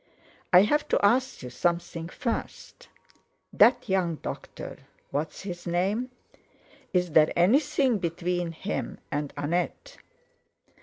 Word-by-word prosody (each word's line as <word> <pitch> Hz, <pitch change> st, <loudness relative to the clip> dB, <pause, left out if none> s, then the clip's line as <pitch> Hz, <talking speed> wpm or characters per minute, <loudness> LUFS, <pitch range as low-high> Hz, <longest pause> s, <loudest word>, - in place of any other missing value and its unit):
"I 180 Hz, +1 st, +8 dB
have 295 Hz, +8 st, +1 dB
to -, -, +2 dB
ask 255 Hz, -, +2 dB
you 125 Hz, -, -7 dB
something 170 Hz, +3 st, -1 dB
first: 235 Hz, +4 st, -5 dB, 0.6 s
That -, -, +5 dB
young 185 Hz, -4 st, +1 dB
doctor—what's 150 Hz, 0 st, -7 dB
his 175 Hz, -3 st, -7 dB
name? 195 Hz, +8 st, 0 dB, 0.8 s
Is 180 Hz, -2 st, +1 dB
there 155 Hz, 0 st, +5 dB
anything 260 Hz, -, +3 dB
between 175 Hz, 0 st, -2 dB
him 190 Hz, +5 st, -4 dB
and 145 Hz, 0 st, -2 dB
Annette?" 175 Hz, -, -2 dB
180 Hz, 105 wpm, -27 LUFS, 165-210 Hz, 0.8 s, I